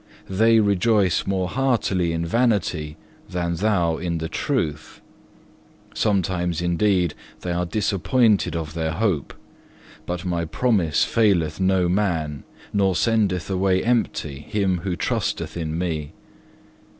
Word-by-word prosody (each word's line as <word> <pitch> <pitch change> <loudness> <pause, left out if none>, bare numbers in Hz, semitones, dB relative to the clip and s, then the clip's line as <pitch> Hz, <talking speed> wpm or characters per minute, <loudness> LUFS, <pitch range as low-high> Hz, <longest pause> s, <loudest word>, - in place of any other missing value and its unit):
They 110 +4 +4
rejoice 100 -2 +2
more 95 -2 0
heartily 110 -9 0
in 85 0 -2
vanity 90 -8 0 0.3
than 85 -1 -2
thou 90 -5 +1
in 85 -1 -2
the 80 0 -3
truth. 75 0 -2 0.9
Sometimes, 90 -4 0
indeed, 90 -1 +1 0.3
they 90 - -3
are 90 0 -1
disappointed 105 +2 +1
of 80 -2 -4
their 80 -1 -2
hope, 90 -6 -1 0.8
but 90 +1 -4
my 85 -2 -1
promise 80 - +1
faileth 90 -9 +2
no 95 -1 +2
man, 85 -7 -1 0.3
nor 95 -2 +2
sendeth 100 -5 +1
away 95 -1 +1
empty 110 - -1
him 95 +2 -1
who 90 +1 -3
trusteth - - -2
in 80 -2 -3
Me. 80 -4 -3
90 Hz, 120 wpm, -23 LUFS, 85-100 Hz, 0.9 s, They